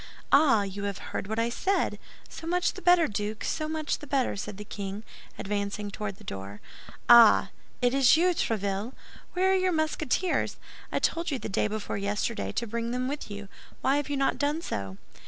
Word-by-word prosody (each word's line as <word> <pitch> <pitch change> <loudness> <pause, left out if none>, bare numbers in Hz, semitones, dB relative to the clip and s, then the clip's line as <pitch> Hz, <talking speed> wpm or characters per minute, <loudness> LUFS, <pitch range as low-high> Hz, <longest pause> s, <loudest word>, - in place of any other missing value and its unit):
"Ah! 275 -8 +5
You 200 +1 -5
have 200 -2 -3 0.2
heard - - -3
what 220 +1 -3
I 230 +1 +1
said? 385 +11 0 0.3
So 325 - -9
much 350 0 +1
the 380 - -9
better, 355 -2 +5
Duke, 210 +1 -3
so 310 -1 -2
much 310 -1 -2
the 295 - -10
better," 270 -2 +1
said 205 0 -6
the 210 - -8
king, 200 0 -6 0.3
advancing 205 0 -3
toward 205 -1 -4
the - - -16
door. 100 +1 -7 0.5
"Ah! 235 -2 +8 0.3
It 245 0 +3
is 270 +1 +6
you, 355 +2 +4
Tréville. 215 - -1 0.4
Where 375 +1 +3
are - - +4
your 370 -1 +2
Musketeers? 315 +1 0 0.3
I - - 0
told 335 +1 0
you 280 - -1
the - - -6
day 195 - +1
before 210 -1 -4
yesterday 210 +3 -2
to 235 - -2
bring 230 +1 -3
them 250 +1 -1
with 285 -3 -4
you; 205 -1 -7 0.3
why 270 +2 +3
have 290 0 -2
you 285 - -1
not 270 0 +1
done 295 +2 +1
so?" 95 - -4
235 Hz, 195 wpm, -28 LUFS, 205-310 Hz, 0.5 s, Ah